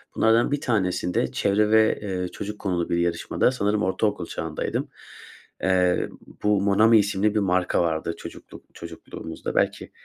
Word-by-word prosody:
bunlardan 115 +4 +3
bir 145 0 -1
tanesinde 90 - 0
çevre 105 +1 +1
ve, 110 0 +4
eee, 95 -3 -3
çocuk 105 +3 -7
konulu 90 -4 -2
bir 85 - +1
yarışmada, 85 +7 +1
sanırım 105 -4 0
ortaokul 95 -1 0
çağındaydım. - - -4 0.7
Eee, 90 -1 +2 0.3
bu 105 -1 +3
Monami 110 +3 +5
isimli 105 +1 +1
bir - - +3
marka 90 -3 +1
vardı, 85 0 -1
çocukluk - - -11
çocukluğumuzda 80 -1 -8
belki. - - 0
100 Hz, 135 wpm, -24 LUFS, 90-105 Hz, 0.7 s, Monami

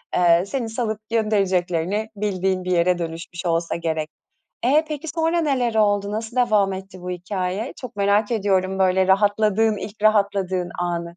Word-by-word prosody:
eee, 175 0 +4
seni 235 +1 -3
salıp 220 -2 -2
göndereceklerini 200 -2 0
bildiğin 190 -2 -1
bir 185 - -3
yere 175 +1 +3
dönüşmüş 170 +1 -6
olsa 170 0 0
gerek. 160 -2 -2 0.6
E, 300 +5 +4
peki 305 +1 -5
sonra 325 +2 +1
neler 255 -7 0
oldu, 205 -2 +2
nasıl 225 +3 -5
devam 210 -6 +3
etti 190 -1 -8
bu 180 0 -6
hikâye? 185 +4 -3
Çok 250 -5 -8
merak 205 +2 +2
ediyorum, 190 -3 0
böyle 190 0 +3
rahatladığın, 210 +2 +3
ilk 205 +1 -8
rahatladığın 200 -4 +1
anı. 175 -1 -1
200 Hz, 150 wpm, -22 LUFS, 180-220 Hz, 0.6 s, eee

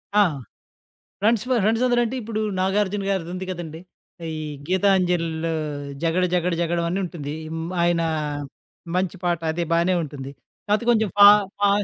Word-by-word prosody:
ఆ! 210 - +7 1.0
Friends 215 +1 +2
for 250 -3 +2
ఫ్రెండ్సందరంటే, 240 +2 +2
ఇప్పుడు 220 0 -3 0.2
నాగార్జున 200 +1 0
గారిది 180 -4 -2
ఉంది 185 0 -5
కదండీ, 165 -3 -6 0.5
ఈ - - -3 0.4
'గీతాంజలి'లో 180 -4 +1 0.5
'జగడ 170 +2 +2
జగడ 180 0 +1
జగడం' 170 0 0
అని 190 - -1
ఉంటుంది. 150 -4 -5 0.2
హ్మ్, 165 +1 -4
ఆయన 170 -1 +2 0.9
మంచి 185 0 -1
పాట, 170 -2 +1
అది 170 +2 -1
బాగానే 170 +2 +3
ఉంటుంది. 135 -2 -7 0.4
కాకపోతే 215 +3 +1
కొంచెం 220 -2 +2
ఫా 205 0 +11 0.3
ఫా 205 0 +4
185 Hz, 135 wpm, -23 LUFS, 170-205 Hz, 1.0 s, ఫా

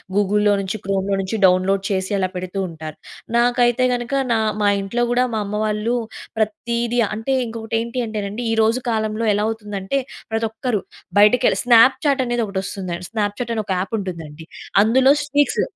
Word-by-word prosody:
గూగుల్‌లో 205 +1 +3
నుంచి 195 +2 -3
క్రోమ్‌లో 195 0 0
నుంచి 190 +3 -3
డౌన్‌లోడ్ 185 +1 +3
చేసి 190 -1 -1
అలా 190 -1 +1
పెడుతూ 185 +2 -4
ఉంటారు. 160 -2 -8 0.4
నాకైతే 245 +1 +3
గనుక 240 +2 -3 0.2
నా - - +2 0.2
మా 205 - +3
ఇంట్లో 235 +5 -1
కూడా 245 +1 +3
మా 220 - 0
అమ్మ 210 +1 -3
వాళ్ళు, 215 +3 0 0.4
ప్రతీది 235 +2 -1 0.2
అంటే 225 +5 -2
ఇంకొకటి 225 0 -4
ఏంటి 235 +2 -3
అంటే 215 -1 -4
నండి 220 +5 -5
ఈరోజు 225 +2 +2
కాలంలో 220 0 -1
ఎలా 205 +1 0
అవుతుందంటే 210 -3 -4
అంటే 195 +9 -1 0.4
ప్రతి 225 0 +1
ఒక్కరు 225 -1 -2 0.4
బయటకెళ్ళి 225 +5 +5
స్నాప్‌చాట్ 260 +4 +5
అనేది 240 -1 0
ఒకటి 195 -2 -3
వస్తుంది. 185 -2 -4 0.2
స్నాప్‌చాట్ 220 +2 -2
అనే 215 - -1
ఒక 190 - -1
ఆప్ 190 +3 -6
ఉంటుందండి. 165 -5 -7 0.4
అందులో 260 +5 +5
స్టీక్స్ 290 0 +1
220 Hz, 165 wpm, -20 LUFS, 195-240 Hz, 0.4 s, బయటకెళ్ళి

